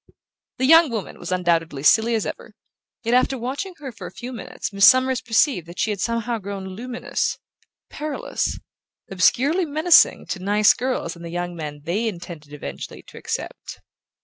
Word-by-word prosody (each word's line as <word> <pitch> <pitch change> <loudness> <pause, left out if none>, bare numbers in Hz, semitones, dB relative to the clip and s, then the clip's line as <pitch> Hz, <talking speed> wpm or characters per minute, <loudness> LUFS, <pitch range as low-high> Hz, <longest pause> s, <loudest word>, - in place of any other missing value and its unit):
The 260 - +1
young 325 +2 +7
woman 220 -5 -5
was - - -6
undoubtedly 170 -5 0
as 150 - +7
silly 230 +1 +2
as 220 - -1
ever; - - -7 0.5
yet 230 +1 0
after 255 +1 +3
watching 280 +11 -4
her 280 -4 -7
for 230 - -9
a - - -10
few 250 +1 -8
minutes 210 -2 -6
Miss 200 0 +6
Summers 255 -1 +5
perceived 230 - +2
that 170 - -11
she 220 - +1
had 200 - -4
somehow 230 0 -1
grown 200 -1 -6
luminous, 240 +6 -3 0.5
perilous, 300 -1 -3 0.5
obscurely 275 - +3
menacing 315 +3 +4
to 190 - -3
nice 205 +2 +4
girls 250 -10 -3
and 170 - -12
the 170 - -6
young 175 +1 -4
men 150 -3 -6
they 195 +9 -1
intended 170 -6 -7
eventually 150 - -8
to - - -13
accept. - - -5
220 Hz, 175 wpm, -22 LUFS, 175-255 Hz, 0.5 s, young